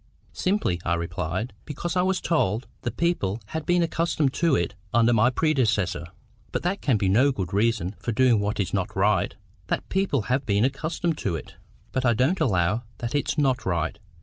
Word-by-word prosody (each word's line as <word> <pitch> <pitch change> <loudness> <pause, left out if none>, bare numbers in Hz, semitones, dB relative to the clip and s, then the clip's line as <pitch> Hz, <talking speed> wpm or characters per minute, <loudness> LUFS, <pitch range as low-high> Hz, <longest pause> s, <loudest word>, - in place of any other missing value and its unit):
"Simply," 180 - 0
I 85 - +1
replied, 85 +6 -3
"because 170 +4 -4
I 180 - +3
was 190 0 +1
told 115 - 0 0.2
the 120 - -2
people 120 - 0
had 160 -1 -4
been 175 0 +3
accustomed 160 -4 0
to 165 -4 +2
it 85 - 0 0.2
under 120 +1 +4
my 115 +2 +5
predecessor." 110 - +1 0.4
"But - - -2
that 180 +3 -1
can 130 -6 +2
be 100 - 0
no 120 +9 +4
good 95 -7 -4
reason 105 -3 +1
for 115 - -2
doing 120 -1 +4
what 105 +1 -2
is 95 -3 -1
not 95 -3 -1
right—that 95 -1 -1
people 190 - +1
have 130 +4 0
been 105 0 +2
accustomed 155 +4 -1
to 95 -5 -1
it." 80 - -7 0.4
"But 130 - -1
I 120 -2 +3
don't 135 - +2
allow 95 0 +2 0.2
that 120 -1 -4
it's 145 +2 0
not 130 -4 +2
right. 85 +2 -1
120 Hz, 185 wpm, -25 LUFS, 100-155 Hz, 0.4 s, my